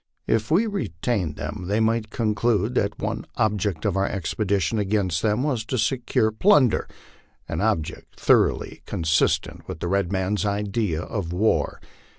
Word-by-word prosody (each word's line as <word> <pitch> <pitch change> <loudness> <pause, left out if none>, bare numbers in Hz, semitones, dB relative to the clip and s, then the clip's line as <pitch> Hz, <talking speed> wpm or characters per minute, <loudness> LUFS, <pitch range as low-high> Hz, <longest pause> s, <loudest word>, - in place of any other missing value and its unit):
If 110 -1 0
we 180 +9 +4
retained 105 - -2
them 90 - -5
they 105 +3 +1
might 110 -1 +1
conclude 110 0 +1
that 100 -5 0
one - - -3
object 105 -5 0
of 100 -3 +1
our 95 0 +1
expedition 100 +1 -1
against 95 -5 0
them 110 +3 +1
was 130 -7 0
to 130 - -2
secure 120 -2 +1
plunder, 130 - +4 0.6
an - - -3
object 80 -2 -2
thoroughly - - +2
con - - -3
sistent 80 0 +1
with - - -6
the 85 - -3
red 100 0 0
man's 95 +2 0
idea 100 -4 -1
of 90 -5 -4
war. 100 +5 +1
105 Hz, 155 wpm, -24 LUFS, 95-115 Hz, 0.6 s, we